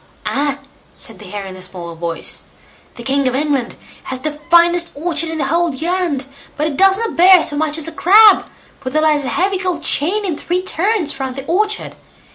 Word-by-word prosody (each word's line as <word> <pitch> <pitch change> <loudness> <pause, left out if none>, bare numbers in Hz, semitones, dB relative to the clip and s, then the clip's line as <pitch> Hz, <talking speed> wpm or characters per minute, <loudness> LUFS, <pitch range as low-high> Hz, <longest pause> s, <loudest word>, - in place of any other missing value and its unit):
"Ah!" 280 0 0 0.4
said - - -11
the - - -11
Hare 205 -1 -6
in 190 -1 -9
a 185 - -11
small 180 -2 -8
voice; 165 0 -5 0.5
"the 240 - -9
king 275 +1 +1
of 255 - 0
England 280 -3 -1 0.3
has 260 - -4
the 300 0 -4
finest 345 0 +4
orchard 325 +1 0
in 320 - -4
the 285 - -1
whole 335 +4 +1
land, 330 -2 -1 0.3
but 300 - 0
it 310 -2 -2
does 385 +4 +4
not 455 +1 -3
bear 365 +1 +6
so 290 - -1
much 305 +1 0
as 320 - -2
a - - -5
crab, 410 +5 +5 0.3
for 255 - -5
there 310 +4 0
lies 300 -2 +2
a - - -2
heavy 380 +1 0
gold 360 -4 -3
chain 395 +8 +1
in 350 -5 -1
three 355 +4 -2
turns 375 -4 -1
round 265 -1 -4
the 270 0 -7
orchard. 420 +6 -1
315 Hz, 210 wpm, -17 LUFS, 270-360 Hz, 0.5 s, bear